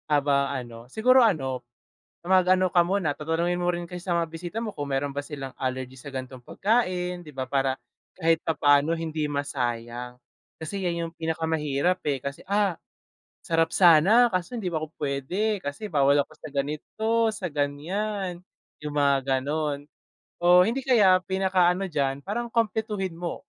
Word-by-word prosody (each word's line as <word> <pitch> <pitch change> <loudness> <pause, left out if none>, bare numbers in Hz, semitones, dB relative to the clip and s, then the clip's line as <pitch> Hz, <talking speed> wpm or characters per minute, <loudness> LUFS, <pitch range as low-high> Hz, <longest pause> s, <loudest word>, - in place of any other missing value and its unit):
Aba 140 -1 +2
ano, 120 -2 -8
siguro 255 - +5
ano, 135 - +1 0.6
mag 185 0 +4
ano 185 -1 +3
ka 175 - +6
muna, 175 -3 0
tatanungin 165 +4 -1
mo 175 - +1
rin 175 0 -2
kasi 180 +1 -8
sa 180 -2 0
mga 170 -1 0
bisita 170 +5 -7
mo 215 -3 -4
kung 145 -1 -5
meron 135 +1 -1
ba 145 - -1
silang 140 -3 -7
allergy 130 -1 -3
sa 145 - -9
gan'tong 130 -1 -7
pagkain, 185 - 0
'di 155 -3 -12
ba, 130 -1 -2
para 135 0 0 0.4
kahit 165 -2 +2
papaano 150 0 +3
hindi 160 -2 -2
masayang. 125 -3 -3 0.4
Kasi 195 +5 -5
'yan 170 -1 -1
yung 165 - -13
pinakamahirap, 160 0 -1
eh, 140 - +1
kasi, 140 0 -5
"Ah, 200 -3 +2 0.7
sarap 165 0 +1
sana 190 +8 +6
kaso 185 +6 -2
hindi 210 -6 -2
pa 160 - -1
ako 155 - -5
pwede 175 +10 -1
kasi 145 +7 -6
bawal 140 -1 +4
ako - - -18
sa - - -10
ganito, 150 +10 -3 0.3
sa 205 -3 -4
ganyan," 175 +7 -2 0.5
yung 150 -1 -4
mga 140 -2 +2
gano'n. 145 0 -2 0.5
Oh, 175 +1 +7
hindi 235 +5 -1
kaya, 210 -8 +5
pinaka 190 -1 +2
ano 190 +2 -3
diyan, 140 -4 -1
parang 235 +5 -3
kumpletuhin 215 -4 -1
mo. 170 0 -5
165 Hz, 165 wpm, -26 LUFS, 140-185 Hz, 0.7 s, Oh